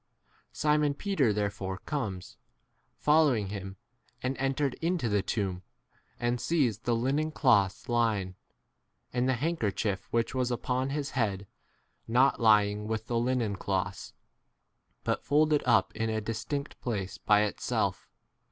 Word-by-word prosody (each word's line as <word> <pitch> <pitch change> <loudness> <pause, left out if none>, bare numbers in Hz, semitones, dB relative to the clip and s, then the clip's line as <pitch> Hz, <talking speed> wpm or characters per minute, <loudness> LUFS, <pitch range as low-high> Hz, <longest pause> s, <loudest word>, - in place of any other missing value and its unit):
Simon 150 -1 +2
Peter 155 - +1
there 105 0 0
fore 95 -2 -5
comes, 100 -9 -4 0.6
following 145 -10 +3
him, 95 -1 -6 0.5
and 130 +1 -1
entered 135 0 0
into 170 -6 0
the 105 -2 +2
tomb, 95 -3 -2 0.6
and 120 0 0
sees 140 - +1
7 115 - -35
the 120 -2 +2
linen 135 +6 0
cloths 105 -11 +2
lying, 110 -6 +1 0.8
and 125 +1 +1
the - - +3
handkerchief 110 - -1
which 115 +1 0
was 130 -1 0
upon 125 +2 -1
his 145 0 -3
head 100 -6 -1 0.6
not 125 +4 +3
lying 105 -1 +4
with 110 0 -2
the 115 0 0
linen 120 -4 0
cloths, 95 0 -3 0.9
but - - -1
folded 150 +1 +3
up 110 -2 +3
in 115 0 -1
a 110 0 0
distinct 140 +7 -4
8 - - -46
place 100 -6 -3
by 105 -1 +4
itself. 105 - -2
115 Hz, 140 wpm, -29 LUFS, 105-135 Hz, 0.9 s, lying